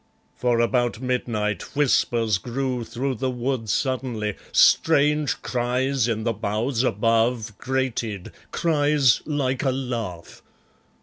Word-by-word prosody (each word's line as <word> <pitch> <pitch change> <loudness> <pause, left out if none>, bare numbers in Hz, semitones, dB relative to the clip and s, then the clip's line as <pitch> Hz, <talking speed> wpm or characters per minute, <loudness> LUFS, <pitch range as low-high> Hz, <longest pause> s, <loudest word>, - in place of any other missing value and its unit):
For 120 -2 +1
about 120 -1 +1
midnight 115 -5 -2
Whispers 115 -7 +2
grew 125 +3 -3
through 120 +4 -3
the 130 +2 -2
wood 125 -2 -2
suddenly, 120 -5 -1 0.2
strange 150 -2 +4
cries 125 +1 0
in 110 -2 -1
the 115 0 0
boughs 110 +4 -1
above 115 -1 +1
Grated, 125 -7 -2 0.2
cries 145 -5 +2
like 135 -4 -1
a 135 - +1
laugh. 120 -10 -4
125 Hz, 110 wpm, -24 LUFS, 115-130 Hz, 0.2 s, strange